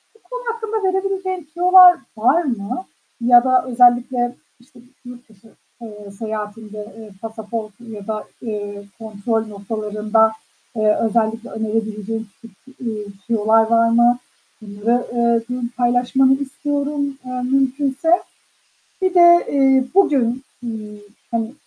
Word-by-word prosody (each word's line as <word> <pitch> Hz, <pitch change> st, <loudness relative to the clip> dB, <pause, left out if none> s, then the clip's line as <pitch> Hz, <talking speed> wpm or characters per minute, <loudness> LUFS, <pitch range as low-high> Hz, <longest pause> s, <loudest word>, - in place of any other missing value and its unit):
Bu -, -, -24 dB
konu -, -, -5 dB
hakkında 445 Hz, -1 st, -4 dB
verebileceğin 375 Hz, -3 st, -3 dB
tüyolar 360 Hz, 0 st, +7 dB, 0.2 s
var 265 Hz, +10 st, +3 dB
mı 245 Hz, -, -4 dB, 0.4 s
ya 240 Hz, 0 st, +6 dB
da 255 Hz, -1 st, +3 dB
özellikle 245 Hz, 0 st, +2 dB, 0.2 s
işte 245 Hz, 0 st, -21 dB, 0.3 s
yurt 245 Hz, -1 st, -12 dB
dışı, 215 Hz, +1 st, -21 dB, 0.3 s
eee, 210 Hz, -3 st, -10 dB
seyahatinde, 215 Hz, -1 st, -6 dB
ııı, 220 Hz, -1 st, -11 dB
pasaportun 220 Hz, 0 st, -7 dB
ya 205 Hz, -2 st, -9 dB
da, 215 Hz, -1 st, -3 dB, 0.2 s
ııı, 205 Hz, -2 st, -5 dB, 0.2 s
kontrol 220 Hz, +1 st, -2 dB
noktalarında, 215 Hz, +1 st, 0 dB, 0.4 s
eee, 215 Hz, -1 st, +2 dB
özellikle 225 Hz, +1 st, 0 dB
önerebileceğin, 220 Hz, 0 st, -3 dB
küçük, 225 Hz, -4 st, -16 dB, 0.2 s
eee, 220 Hz, -4 st, -4 dB, 0.2 s
tüyolar 225 Hz, -1 st, +3 dB
var 230 Hz, 0 st, +4 dB
mı? 235 Hz, +1 st, +4 dB, 0.4 s
Bunları, 215 Hz, +4 st, -1 dB
eee, 235 Hz, -1 st, +2 dB
bugün 250 Hz, -1 st, -3 dB
paylaşmanı 250 Hz, +2 st, +3 dB
istiyorum, 285 Hz, +1 st, -2 dB
eee, 255 Hz, 0 st, -4 dB
mümkünse. 270 Hz, +3 st, 0 dB, 0.9 s
Bir 375 Hz, -1 st, +1 dB
de, 345 Hz, -1 st, +7 dB
eee, 270 Hz, -2 st, +4 dB
bugün, 265 Hz, -9 st, +2 dB, 0.2 s
ııı, 215 Hz, -2 st, -7 dB, 0.3 s
hani, 230 Hz, +1 st, -2 dB
235 Hz, 120 wpm, -19 LUFS, 220-265 Hz, 0.9 s, tüyolar